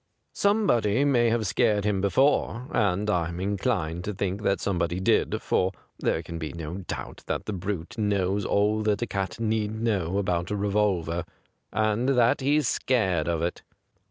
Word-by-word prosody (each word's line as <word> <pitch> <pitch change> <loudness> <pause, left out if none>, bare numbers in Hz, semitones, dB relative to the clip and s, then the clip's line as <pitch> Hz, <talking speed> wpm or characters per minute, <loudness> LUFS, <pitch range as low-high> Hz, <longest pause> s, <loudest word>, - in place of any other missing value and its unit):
Somebody 140 - +2
may 120 -4 +3
have 115 -1 0
scared 105 0 +2
him 100 -2 +1
before, 125 +3 +2
and 100 - +1
I'm 85 -4 0
inclined 95 -4 -1
to 105 - -3
think 95 +1 -2
that 100 -2 +1
soixiebody 85 -2 -1
did, - - +2
for 95 +1 +1 0.3
there 80 - 0
can 85 +1 -6
be 80 -1 -5
no 85 +1 -5
doubt 90 - -6
that - - -2
the 110 - -3
brute 95 +1 -4
knows 100 -1 +1
all 105 +2 +2
that 105 +1 +1
a - - +1
cat 95 -1 -3
need 110 -1 -1
know 100 -6 0
about 90 -3 0
a 105 - -1
revolver, 100 -5 0 0.5
and 110 +4 +1
that 120 +2 +4
he's 145 0 +2
scared 95 -14 +1
of 85 -1 0
it. 85 - -2
100 Hz, 165 wpm, -26 LUFS, 90-110 Hz, 0.5 s, that